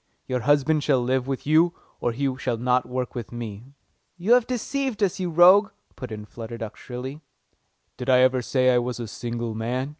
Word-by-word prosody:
Your 130 -1 -1
husband 145 +4 +2
shall 140 -3 +3
live 130 +1 0
with 135 -1 -3
you, 160 +3 +3 0.2
or 120 - 0
he 135 +2 -1
shall 125 -3 -1
not 125 +1 +1
work 125 0 -3
with 120 -3 -6
me." 120 +2 -8 0.4
"You 190 +7 +3
have 245 -2 +4
deceived 255 -2 -2
us, 195 -1 0
you 180 -1 -1
rogue!" 185 +5 +6 0.3
put 125 -4 -8
in 105 -1 -6
Flutter 115 +1 -8
Duck 110 -2 -6
shrilly. 130 +4 -7 0.8
"Did 125 +1 -4
I 125 -1 +6
ever 130 0 +3
say 130 +1 +2
I 125 - +4
was 120 0 -3
a 120 - -4
single 120 +1 -4
man?" 125 +5 -2
130 Hz, 200 wpm, -24 LUFS, 120-155 Hz, 0.8 s, rogue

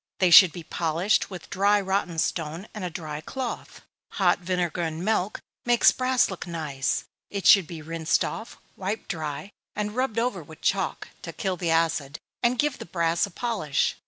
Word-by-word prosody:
They 185 -2 +3
should 185 0 +10
be 175 0 -8
polished 170 +5 0
with 185 -4 -9
dry 200 +2 +3
rotten 190 -3 -1
stone, 160 +4 -2
and 210 - -6
a 180 - -2
dry 155 -2 -6
cloth. 260 +7 -6 0.3
Hot 180 -3 +3
vinegar 180 -1 -1
and 165 +1 -3
milk 210 -2 0 0.2
makes 240 -1 +5
brass 255 -4 +2
look 185 - -6
nice 150 -6 -2 0.3
it 200 -1 -4
should 195 -5 +7
be 160 -2 -8
rinsed 165 +1 0
off, 225 - -6 0.2
wiped 200 +3 -4
dry, 160 +3 -4 0.2
and 210 +1 -3
rubbed 255 -3 -1
over 245 +2 0
with - - -14
chalk, - - -1
to - - -6
kill 190 -3 -2
the 175 -1 -2
acid, 165 -3 +1 0.2
and 245 +1 +2
give 290 +1 0
the - - -7
brass 170 +2 +1
a - - -11
polish. 195 - -1
180 Hz, 180 wpm, -26 LUFS, 165-210 Hz, 0.3 s, should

